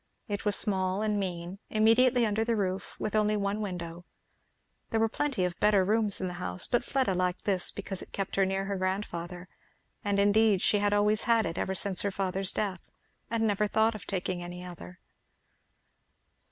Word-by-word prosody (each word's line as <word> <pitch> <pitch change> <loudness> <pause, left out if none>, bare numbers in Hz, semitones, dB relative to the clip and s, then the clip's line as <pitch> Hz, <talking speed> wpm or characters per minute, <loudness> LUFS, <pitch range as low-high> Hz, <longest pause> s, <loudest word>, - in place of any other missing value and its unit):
It 205 0 -4
was 205 -1 +3
small 190 0 +2
and 210 -1 0
mean, 180 0 -4
immediately 230 +3 +4
under 215 +1 0
the 230 0 0
roof, 190 -2 -2
with 210 - -3
only 210 0 +2
one 200 +1 -1
window. 175 -4 -5 0.9
There 225 - 0
were 225 - +3
plenty 255 -4 -1
of 175 -1 -4
better 205 -3 +4
rooms 210 0 +3
in 190 - -2
the 180 - -5
house, 180 0 -2
but 240 -1 +1
Fleda 260 -6 0
liked 180 0 -1
this 190 -3 +2
because 195 -2 -5
it - - -11
kept 195 -1 -4
her 195 - +3
near 195 0 -1
her 200 0 -2
grandfather; 185 -2 -3 0.6
and 200 -1 0
indeed 205 0 +4
she 205 - +3
had 205 0 +1
always 210 +1 +2
had 230 -2 +3
it 165 0 -3
ever 190 - -1
since 190 -2 0
her 200 - 0
father's 190 0 -2
death, 190 -4 -2 0.5
and 225 -1 0
never 210 0 +1
thought 220 +2 +2
of 215 - -9
taking 185 -2 -2
any 175 +1 -7
other. 125 - -10
200 Hz, 190 wpm, -29 LUFS, 185-215 Hz, 0.9 s, immediately